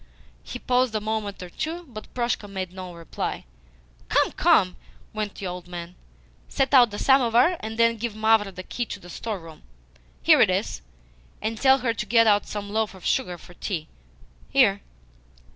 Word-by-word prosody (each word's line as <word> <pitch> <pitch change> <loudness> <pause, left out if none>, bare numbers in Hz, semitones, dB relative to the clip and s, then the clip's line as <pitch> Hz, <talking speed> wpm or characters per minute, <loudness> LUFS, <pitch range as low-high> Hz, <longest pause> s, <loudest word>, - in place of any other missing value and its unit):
He - - -7
paused 250 -2 +1
a - - +2
moment 210 -2 -3
or 180 - -9
two, 335 - -4
but 215 -5 -10
Proshka 235 -4 -1
made 190 -2 -5
no 185 -1 -7
reply. 165 -1 -5 0.6
"Come, - - +3
come!" 180 -1 +3 0.4
went 215 -2 -3
on - - -31
the 195 - -5
old 180 -1 -6
man. 175 0 -7 0.6
"Set 270 +1 0
out 245 -3 +7
the 205 - -6
samovar, 265 - +4
and 220 +1 -6
then 230 0 +3
give 225 -1 -4
Mavra 215 -2 +3
the 185 0 -8
key 240 +5 -4
of 200 - -15
the 175 - -10
store 220 +2 -4
room 165 -2 -13 0.6
here - - +6
it - - +6
is - - -1 0.6
and 220 +2 -2
tell 265 0 +6
her 230 - +2
to - - -4
get 230 -1 +5
out 205 -2 +3
some 205 -1 -5
loaf 210 -4 -2
sugar 180 -10 0
for 175 - -15
tea. 170 -4 -4 0.6
Here! - - +4
215 Hz, 180 wpm, -25 LUFS, 185-235 Hz, 0.6 s, out